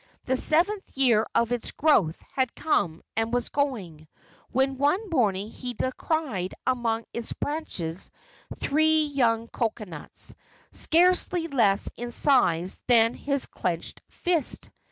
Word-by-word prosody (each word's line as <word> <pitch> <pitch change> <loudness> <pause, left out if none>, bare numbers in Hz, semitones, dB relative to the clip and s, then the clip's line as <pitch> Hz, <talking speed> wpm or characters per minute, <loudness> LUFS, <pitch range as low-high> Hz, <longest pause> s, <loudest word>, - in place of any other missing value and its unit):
The 260 - +1
seventh 350 +7 +1
year 235 -5 +3
of 235 0 +2
its 245 -2 0
growth 210 - +2
had 260 -3 0
come 170 - 0
and 225 +1 0
was 245 -1 -1
going, 195 - -3 0.4
when 265 +1 0
one 360 +8 +1
morning 210 - +1
he 250 -1 -6
descried 260 - -2
among 230 -3 0
its 235 -1 -3
branches 190 - -4 0.5
three 315 +2 +3
young 235 -6 +1
cocoanuts, 215 -10 -4 0.4
scarcely 355 0 +3
less 225 -10 +2
in 240 0 -5
size 190 - +3
than 230 -1 +5
his 280 -2 -1
clenched 170 -2 -3
fist. 340 -6 -1
245 Hz, 120 wpm, -26 LUFS, 215-295 Hz, 0.5 s, than